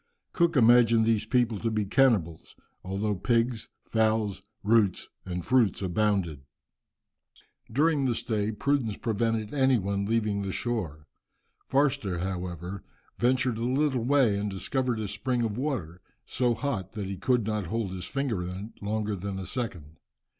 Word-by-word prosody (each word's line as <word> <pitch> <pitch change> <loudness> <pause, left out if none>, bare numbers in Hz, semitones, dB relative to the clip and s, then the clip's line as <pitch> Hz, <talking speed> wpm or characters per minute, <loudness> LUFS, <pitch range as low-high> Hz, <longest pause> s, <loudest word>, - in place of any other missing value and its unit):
Cook 170 -3 +2
imagined 115 -1 +6
these 110 -1 +1
people 120 -4 +1
to 115 - -1
be 110 -2 0
cannibals, 100 - +1 0.3
although 100 +3 -1
pigs, 115 +3 0 0.2
fowls, 110 -3 0 0.2
roots, 105 -3 +2 0.2
and 90 -2 -4
fruits 120 -7 +3
abounded. 95 -5 0 1.3
During 145 +2 +2
the 120 -3 +1
stay 110 -2 -1
prudence 120 -2 0
prevented 115 0 -1
any 135 -2 +4
one 100 -1 -1
leaving 105 -2 0
the 100 -1 -3
shore. 90 -11 -3 0.6
Forster, 135 -9 +1
however, 90 0 -4 0.4
ventured 125 -1 +2
a - - -2
little 130 0 +1
way 125 -6 +3
and 105 0 -2
discovered 120 +5 -1
a 110 - -2
spring 120 +5 -1
of 110 -3 -1
water, 105 - -3 0.2
so 120 -2 0
hot 110 -10 -3
that 105 -3 -4
he 95 +1 -4
could 115 +4 +1
not 105 -4 -2
hold 110 0 -2
his 90 -1 -5
finger 135 -9 -2
in 95 +5 -6
it - - -27
longer 105 0 -1
than 100 +1 -5
a 95 - -5
second. 90 - -5
110 Hz, 150 wpm, -28 LUFS, 95-125 Hz, 1.3 s, imagined